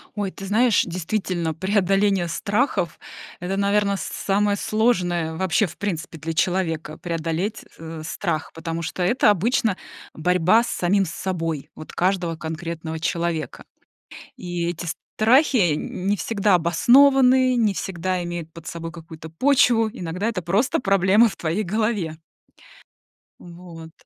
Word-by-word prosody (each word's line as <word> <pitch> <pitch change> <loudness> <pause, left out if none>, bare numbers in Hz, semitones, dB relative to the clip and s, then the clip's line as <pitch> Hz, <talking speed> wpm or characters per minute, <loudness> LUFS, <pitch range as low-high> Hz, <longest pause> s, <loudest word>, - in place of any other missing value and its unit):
Ой, 200 -2 -2
ты 195 - -9
знаешь, 220 +3 +3
действительно, 175 -1 -2
преодоление 195 +1 +1
страхов- 200 - -1 0.4
это, 185 +2 -3
наверно, 200 0 +2
с - - -6
самое 205 +1 0
сложное 180 -8 0
вообще, 190 +4 +1
в 170 - -12
принципе, 175 -4 -4
для 165 +1 -4
человека- 165 -3 -1
преодолеть, 170 +5 -3
э, 160 0 -8
страх, 160 -1 -3
потому 165 0 -4
что 180 +2 -3
это 210 +5 +3
обычно 210 0 +1 0.4
борьба 180 +6 +3
с - - -5
самим 195 -1 +1
собой, 165 -4 -4
вот 155 - -10
каждого 180 -2 0
конкретного 160 0 -5
человека. 170 -1 -2 0.7
И 175 -1 -3
эти 175 0 -5 0.3
страхи 230 - +4
н 180 +4 -5
не 205 - +3
всегда 200 +1 +1
обоснованы, 255 - +5
не 220 -4 +2
всегда 185 -1 -3
имеют 170 -2 -6
под 165 -1 -11
собой 165 0 -6
какую-то 160 -1 -11
почву, 230 - +3
иногда 180 -1 -4
это 220 -6 -2
просто 195 +9 +1
проблема 195 +2 +4
в 195 - -6
твоей 170 +6 -2
голове. 200 -5 -1 1.2
Вот. 170 -2 -11
180 Hz, 130 wpm, -23 LUFS, 165-205 Hz, 1.2 s, обоснованы